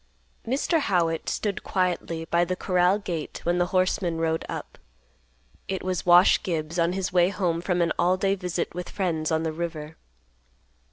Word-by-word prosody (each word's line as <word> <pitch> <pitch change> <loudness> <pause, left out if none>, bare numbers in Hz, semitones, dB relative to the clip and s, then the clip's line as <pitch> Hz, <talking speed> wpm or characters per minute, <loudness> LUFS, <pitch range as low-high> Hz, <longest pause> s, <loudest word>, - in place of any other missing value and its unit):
Mr. 280 +7 +1
Howitt 170 - 0
stood 205 -3 -2
quietly 175 -3 -1
by 170 +1 +2
the 185 +1 -1
corral 180 +1 +2
gate 175 -7 -5
when 175 +1 +1
the 175 - +2
horseman 185 -2 0
rode 160 0 0
up. - - -7 0.9
It 190 -1 -3
was 185 -1 -2
Wash 175 +1 +6
Gibbs, 165 -1 -3
on 170 +1 +2
his 190 -1 -3
way 175 0 +4
home 175 -4 -1
from 175 -1 +1
an 170 - 0
all 180 +2 +3
day 195 +1 +1
visit 180 -3 -3
with 180 +1 -6
friends 165 -6 -1
on 160 0 +1
the 160 -1 -2
river. 160 -2 -5
175 Hz, 170 wpm, -25 LUFS, 165-185 Hz, 0.9 s, Wash